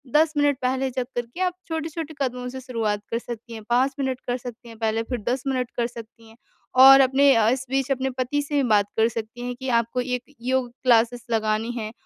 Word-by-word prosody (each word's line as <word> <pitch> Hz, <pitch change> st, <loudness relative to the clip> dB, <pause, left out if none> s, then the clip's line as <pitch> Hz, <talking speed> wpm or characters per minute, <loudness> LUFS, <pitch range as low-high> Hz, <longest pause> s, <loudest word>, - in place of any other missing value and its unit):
10 310 Hz, +1 st, +4 dB
minute 290 Hz, -1 st, +3 dB
पहले 260 Hz, +1 st, 0 dB
जग 255 Hz, 0 st, -2 dB
कर 240 Hz, 0 st, -1 dB
के 240 Hz, +9 st, -13 dB
आप 365 Hz, -1 st, +1 dB
छोटे-छोटे 320 Hz, -1 st, -4 dB
कदमों 250 Hz, -2 st, -2 dB
से 260 Hz, +1 st, -7 dB
शुरुआत 225 Hz, -5 st, -2 dB
कर 230 Hz, -, 0 dB
सकती 235 Hz, 0 st, -8 dB
हैं, 220 Hz, -1 st, -8 dB
5 255 Hz, +3 st, +2 dB
मिनट 260 Hz, -2 st, -1 dB
कर 245 Hz, 0 st, 0 dB
सकती 240 Hz, -1 st, -10 dB
हैं, 225 Hz, -, -12 dB
पहले 225 Hz, 0 st, 0 dB
फिर 245 Hz, +1 st, -4 dB
10 250 Hz, 0 st, -1 dB
मिनट 255 Hz, -2 st, -1 dB
कर 235 Hz, -1 st, +1 dB
सकती 230 Hz, -1 st, -12 dB
हैं 220 Hz, -, -17 dB, 0.5 s
और 270 Hz, 0 st, +10 dB
अपने 270 Hz, +1 st, +5 dB
अ, 220 Hz, -1 st, +4 dB
इस 260 Hz, +2 st, -1 dB
बीच 270 Hz, 0 st, 0 dB
अपने 265 Hz, 0 st, 0 dB
पति 255 Hz, +3 st, -1 dB
से 290 Hz, -1 st, 0 dB
बात 210 Hz, -4 st, +3 dB
कर 225 Hz, 0 st, +4 dB
सकती 230 Hz, +1 st, -6 dB
हैं 245 Hz, 0 st, -4 dB
कि 260 Hz, +2 st, -7 dB
आपको 235 Hz, +1 st, +1 dB
एक 250 Hz, 0 st, -3 dB, 0.2 s
योग 255 Hz, 0 st, 0 dB
क्लासेस 240 Hz, -1 st, +3 dB
लगानी 220 Hz, +1 st, 0 dB
है 220 Hz, -3 st, -5 dB
245 Hz, 225 wpm, -24 LUFS, 230-265 Hz, 0.5 s, और